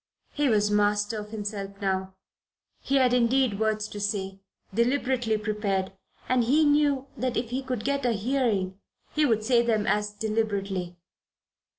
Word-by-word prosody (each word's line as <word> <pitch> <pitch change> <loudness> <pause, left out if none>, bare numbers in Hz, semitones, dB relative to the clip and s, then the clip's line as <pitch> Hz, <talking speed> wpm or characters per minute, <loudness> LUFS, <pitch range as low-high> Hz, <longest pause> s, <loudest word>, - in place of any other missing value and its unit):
He 290 -2 +1
was 210 -2 +2
master 205 +1 +1
of 210 0 -8
himself 205 -2 -5
now. 190 -1 -2 0.7
He 275 - -1
had 255 -2 +4
indeed 245 -3 +2
words 215 -1 0
to 205 - -7
say, 195 -2 -2 0.3
deliberately 245 -1 +1
prepared, 205 -3 -1 0.4
and 255 -1 +3
he 295 +7 +3
knew 290 -2 +3
that 255 0 -2
if 230 0 -2
he 260 +2 -1
could 255 -4 -4
get 280 0 0
a 245 -2 +2
hearing 210 -5 0 0.3
he 300 -1 +3
would 220 -3 +1
say 240 +1 +4
them 220 -3 +1
as 210 0 +1
deliberately. 205 -4 -2
220 Hz, 155 wpm, -27 LUFS, 205-250 Hz, 0.7 s, had